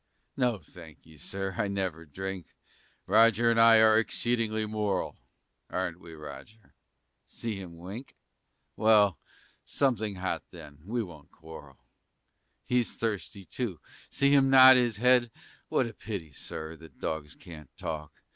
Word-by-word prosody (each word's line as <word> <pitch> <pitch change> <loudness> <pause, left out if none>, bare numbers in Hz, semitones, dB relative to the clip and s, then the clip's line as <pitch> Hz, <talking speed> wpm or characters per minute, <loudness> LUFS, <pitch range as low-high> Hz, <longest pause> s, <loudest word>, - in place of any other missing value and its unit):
No, 125 -4 +1
thank 80 -2 -15
ye, 80 0 -17
Sir, 95 +5 -4
I 105 - +1
never 95 -5 -3
drink; 95 +4 -6 0.6
Roger 115 +1 +4
and 115 0 +3
I 115 0 +8
are 110 0 +6
exceedingly 115 -1 0
moral, 105 -3 -2 0.5
Aren't 90 -2 -3
we, 85 -2 -12
Roger? 75 +8 -12 0.5
See 115 -3 -5
him 85 -3 -10
wink! 100 +10 -9 0.6
Well, 105 -4 +4 0.4
something 110 -7 0
hot, 95 0 -3
then, 70 -1 -12
we 115 +2 -1
won't 80 -7 -13
quarrel. 75 -4 -13 0.8
He's 125 -1 0
thirsty, 100 -3 -4
too, 105 -9 -4 0.3
see 140 0 +2
him 135 -1 +5
nod 130 0 +9
his 120 -4 +1
head? 125 +1 +4 0.4
What - - +2
a 115 - -7
pity, 100 -9 -7
Sir, 80 +3 -7
that 80 0 -16
dogs 75 -2 -4
can't 75 -5 -12
talk! 75 -2 -5
100 Hz, 135 wpm, -29 LUFS, 80-115 Hz, 0.8 s, nod